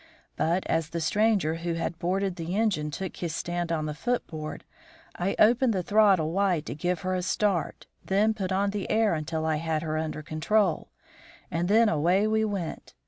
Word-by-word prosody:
But, 170 +4 0
as 165 -1 0
the 170 - -3
stranger 195 -2 +1
who 170 0 -3
had 165 0 -3
boarded 190 +2 -1
the 170 +1 -4
engine 200 -9 +1
took 190 +5 -5
his 165 -2 -3
stand 175 -1 -3
on 155 -2 -1
the 150 - -3
foot 240 +11 -1
board, 155 -2 -7 0.5
I 185 +3 -1
opened 235 +2 +4
the 185 -2 -1
throttle 195 -6 +4
wide 185 -4 +1
to - - -4
give 175 +4 -2
her 185 0 -1
a 185 - 0
start, 190 -1 -1 0.2
then 210 +3 +2
put 195 -3 -4
on 200 +1 +1
the 205 -2 -4
air 220 -2 +3
until 160 0 -2
I 160 -1 +1
had 160 0 -2
her 155 -1 -1
under 155 -1 -4
control, 170 +4 0 0.6
and 170 +1 0
then 220 +3 +5
away 175 +4 +2
we 220 0 +2
went. 200 -6 -4
175 Hz, 195 wpm, -27 LUFS, 160-205 Hz, 0.6 s, then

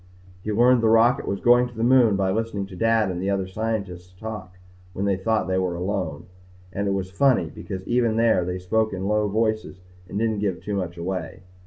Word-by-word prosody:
He 110 - -2
learned 120 +3 +4
the 115 - +3
rocket 115 +4 +4
was 100 - -2
going 120 +1 +5
to 120 - -15
the 115 - -1
moon 120 -4 +5
by 95 -1 +1
listening 110 -1 -2
to 95 -1 -11
Dad 115 -1 +2
and 90 0 -4
the 95 - -1
other 100 -1 0
scientists 95 -3 -4
talk 100 -5 -7 0.4
when 100 - -2
they 100 -1 +2
thought 110 +2 0
they 95 0 +1
were 90 -2 -1
alone. 90 -4 -3 0.5
And 100 0 -2
it 100 - +1
was 95 -1 -3
funny. 130 +6 +2
Because 95 -2 -7
even 120 -2 +2
there, 115 -5 +3
they 90 +1 -3
spoke 110 +4 0
in 95 +1 -3
low 105 0 +1
voices 110 -2 -1 0.3
and - - -5
didn't 110 -1 0
give 100 -3 -1
too 105 - -5
much 90 -3 -3
away. 90 0 -4
100 Hz, 215 wpm, -24 LUFS, 95-115 Hz, 0.5 s, going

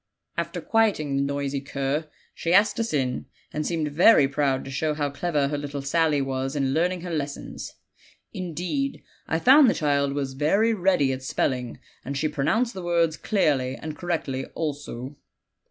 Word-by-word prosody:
After - - -3
quieting 205 -11 +1
the 140 - +2
noisy 140 0 -2
cur 140 +3 -2 0.2
she 170 +2 +1
asked 210 +2 +4
us 230 0 -1
in, 130 -4 -1 0.3
and 150 0 -2
seemed 160 -3 -1
very 160 -1 +6
proud 135 -1 0
to 135 - -7
show 150 +2 -1
how 145 -2 -1
clever 145 -2 0
her 145 0 -2
little 145 -1 -5
Sally 150 0 +2
was 135 +1 -2
in 135 -2 0
learning 175 +3 +1
her 175 -1 -5
lessons; 145 -2 -5 0.6
indeed, 185 - -3 0.2
I 160 - +1
found 265 - +7
the - - +1
child 140 -3 +1
was 140 -2 -2
very 195 +12 +2
ready 180 -9 +2
at 130 - -5
spelling, 125 -2 -1 0.3
and 140 +1 -4
she 155 - +1
pronounced 220 - 0
the 190 - -6
words 170 -2 +1
clearly 140 - +1
and 155 +1 -7
correctly 150 -6 -2
also. 145 -3 -4
150 Hz, 170 wpm, -25 LUFS, 140-175 Hz, 0.6 s, found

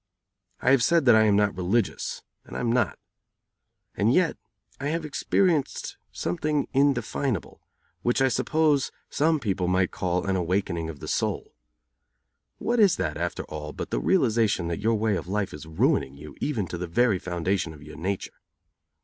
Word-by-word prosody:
I - - +4
have 135 -3 +5
said 170 -4 +3
that 120 - +7
I 110 0 +6
am 105 -2 +4
not 105 0 +2
religious, 95 +4 -1 0.2
and - - -8
I - - -3
am 120 -2 0
not. 120 -2 +1 1.0
And 105 +3 +2
yet 180 +4 +3 0.4
I 140 - -2
have 160 +1 -1
experienced 155 +1 0 0.2
something 145 - -1
indefinable, 135 - 0 0.4
which 120 +5 +1
I 135 - +4
suppose 145 +2 +2 0.2
some 155 +1 +2
people 95 -7 -1
might 90 0 +2
call 90 0 -1
an 95 -1 +1
awakening 90 -2 -1
of 75 -3 -9
the - - -7
soul. - - -2 1.0
What 240 +1 0
is 200 -5 +6
that, 85 -5 -2
after - - -3
all, 75 0 -7
but - - -6
the - - 0
realization 105 - +2
that 85 - -2
your 115 +2 +2
way 110 -1 +1
of 90 - -4
life 100 0 -1
is 75 +2 -9
ruining 70 -3 +1
you 75 +1 -11
even 120 -10 -1
to 85 - -5
the 90 - -3
very 100 +2 +2
foundation 90 0 -1
of 75 -2 -12
your 75 0 -11
nature? 95 +2 -4
105 Hz, 175 wpm, -26 LUFS, 90-135 Hz, 1.0 s, that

